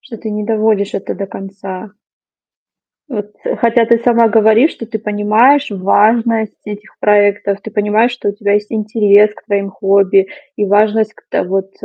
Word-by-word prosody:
Что 265 Hz, -4 st, -11 dB
ты 220 Hz, 0 st, -7 dB
не 210 Hz, 0 st, -4 dB
доводишь 215 Hz, -2 st, 0 dB
это -, -, -4 dB
до 195 Hz, -, -5 dB
конца? 195 Hz, +1 st, -9 dB, 1.2 s
Вот 210 Hz, -5 st, -6 dB, 0.3 s
хотя 230 Hz, -1 st, +2 dB
ты 235 Hz, -1 st, +3 dB
сама 235 Hz, -1 st, +3 dB
говоришь, 220 Hz, +6 st, +4 dB
что 230 Hz, -, -9 dB
ты 220 Hz, -1 st, -5 dB
понимаешь 215 Hz, +7 st, +2 dB
важность 220 Hz, +3 st, +1 dB
этих 210 Hz, 0 st, -10 dB
проектов. 205 Hz, -1 st, +2 dB
Ты 220 Hz, -, -8 dB
понимаешь, 210 Hz, +4 st, +1 dB
что 245 Hz, -4 st, -4 dB
у -, -, -1 dB
тебя 205 Hz, -1 st, -2 dB
есть 210 Hz, 0 st, -1 dB
интерес 210 Hz, -1 st, +3 dB
к -, -, -18 dB
твоим 200 Hz, -2 st, -2 dB
хобби 195 Hz, 0 st, +2 dB, 0.3 s
и 210 Hz, -, 0 dB
важность 215 Hz, +2 st, +1 dB
к -, -, -22 dB
та -, -, -1 dB
вот 190 Hz, +1 st, -3 dB
210 Hz, 165 wpm, -14 LUFS, 200-225 Hz, 1.2 s, говоришь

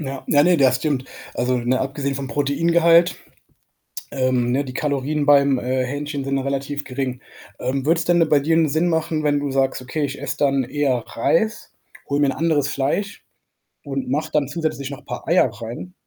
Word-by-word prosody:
Ja, 135 Hz, -3 st, -6 dB
ja, 145 Hz, 0 st, +4 dB
ne, 175 Hz, +1 st, +4 dB
das 130 Hz, -4 st, +4 dB
stimmt. 135 Hz, -1 st, -1 dB, 0.3 s
Also, 125 Hz, +1 st, 0 dB
ne, 125 Hz, +2 st, 0 dB
abgesehen 140 Hz, +1 st, -2 dB
vom 135 Hz, 0 st, -4 dB
Proteingehalt, 165 Hz, +5 st, +3 dB, 1.0 s
ähm, 130 Hz, -2 st, +1 dB
ne, 140 Hz, +3 st, +1 dB
die 130 Hz, -, -7 dB
Kalorien 145 Hz, +1 st, -1 dB
beim, 140 Hz, -2 st, +5 dB
äh, 130 Hz, +1 st, -1 dB
Hähnchen 145 Hz, +1 st, -4 dB
sind 135 Hz, 0 st, -1 dB
relativ 140 Hz, +1 st, -3 dB
gering. 130 Hz, -1 st, -4 dB, 0.4 s
Ähm, 130 Hz, +1 st, -2 dB
würde 165 Hz, +3 st, +3 dB
es 165 Hz, -, -1 dB
denn 175 Hz, -1 st, +3 dB
bei 150 Hz, -, +5 dB
dir 160 Hz, +4 st, +1 dB
'nen 165 Hz, -1 st, +3 dB
Sinn 160 Hz, +5 st, +1 dB
machen, 160 Hz, -2 st, -1 dB
wenn 145 Hz, -1 st, +2 dB
du 145 Hz, -1 st, -2 dB
sagst: 135 Hz, -1 st, 0 dB
„Okay, 145 Hz, +4 st, -3 dB
ich 140 Hz, 0 st, -4 dB
esse 145 Hz, +1 st, -3 dB
dann 140 Hz, -2 st, +2 dB
eher 130 Hz, 0 st, 0 dB
Reis, 215 Hz, -, 0 dB, 0.4 s
hole 140 Hz, +1 st, 0 dB
mir 145 Hz, -, +4 dB
'n -, -, +1 dB
anderes 155 Hz, -4 st, +1 dB
Fleisch 150 Hz, +9 st, -2 dB, 0.6 s
und 135 Hz, -3 st, -4 dB
mache 145 Hz, +4 st, -1 dB
dann 150 Hz, -2 st, +2 dB
zusätzlich 145 Hz, -2 st, -3 dB
noch 140 Hz, 0 st, -9 dB
paar -, -, -7 dB
Eier 170 Hz, -6 st, +3 dB
rein?“ 115 Hz, +10 st, -8 dB
140 Hz, 190 wpm, -21 LUFS, 130-155 Hz, 1.0 s, beim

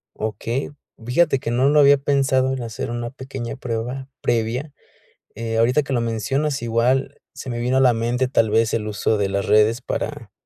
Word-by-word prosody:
Okey, 115 Hz, +6 st, -3 dB, 0.3 s
fíjate 135 Hz, +2 st, +2 dB
que 115 Hz, -, -3 dB
no 130 Hz, +4 st, +3 dB
lo 150 Hz, -, +4 dB
había 140 Hz, 0 st, +7 dB
pensado 135 Hz, -1 st, +1 dB
en 130 Hz, -, -4 dB
hacer 115 Hz, -1 st, -5 dB
una 120 Hz, 0 st, -3 dB
pequeña 130 Hz, -2 st, -6 dB
prueba 125 Hz, +2 st, -4 dB
previa, 120 Hz, +5 st, -1 dB, 0.6 s
eh, 115 Hz, 0 st, -3 dB
ahorita 125 Hz, +6 st, +3 dB
que 140 Hz, -, -7 dB
lo 120 Hz, -, +1 dB
mencionas, 135 Hz, +6 st, -1 dB
igual, 120 Hz, +3 st, 0 dB
se 130 Hz, -, -8 dB
me 120 Hz, 0 st, -3 dB
vino 125 Hz, +2 st, +1 dB
a -, -, +4 dB
la 125 Hz, -2 st, +5 dB
mente, 120 Hz, +3 st, 0 dB
tal 115 Hz, -4 st, +2 dB
vez, 110 Hz, +1 st, +2 dB
el 110 Hz, -1 st, -1 dB
uso 105 Hz, +1 st, 0 dB
de 100 Hz, -, 0 dB
las 100 Hz, 0 st, -1 dB
redes 110 Hz, +3 st, +4 dB
para, -, -, -4 dB
120 Hz, 190 wpm, -21 LUFS, 115-135 Hz, 0.6 s, había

